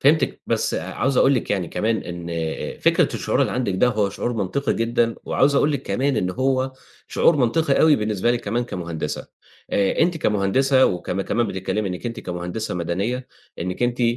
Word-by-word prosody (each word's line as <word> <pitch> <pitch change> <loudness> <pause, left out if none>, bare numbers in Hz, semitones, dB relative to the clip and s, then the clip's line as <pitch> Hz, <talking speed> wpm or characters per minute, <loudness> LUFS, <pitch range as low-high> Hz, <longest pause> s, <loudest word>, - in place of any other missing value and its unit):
فهمتِك 150 +2 +3
بس - - 0
عاوز 135 0 -1
أقول 140 - +5
لِك 125 - -2
يعني 95 -4 0
كمان 110 +1 0
إن 85 -1 -7
آآ 80 -1 -3
فكرة - - +3
الشعور - - 0
اللي - - +2
عندِك 125 -7 -1
ده 110 +7 +3
هو 105 -4 +1
شعور 120 - -3
منطقي 115 +6 -1
جدًا، 115 0 +1
وعاوز 140 +2 +2
أقول 145 +2 +3
لِك 140 - -2
كمان 135 0 0
إن 90 -3 0
هو 130 +4 0 0.4
شعور 165 - +3
منطقي 140 +3 +2
أوي 155 -2 +6
بالنسبة 105 +1 0
لِك 120 0 0
كمان 120 +4 -1
كمهندسة. 85 -7 -4 0.4
آآ 100 -1 +1
أنتِ 170 +1 +3
كمهندسة 130 +3 +3
وكم 90 +1 -2
كمان 115 +4 0
بتتكلمي 100 +1 -2
إنِّك 90 +5 -5
أنتِ 115 - -5
كمهندسة 90 +4 -4
مدنية، 100 +9 -2 0.3
إنِّك 90 +6 -3
أنتِ 120 0 0
115 Hz, 180 wpm, -22 LUFS, 95-130 Hz, 0.4 s, أوي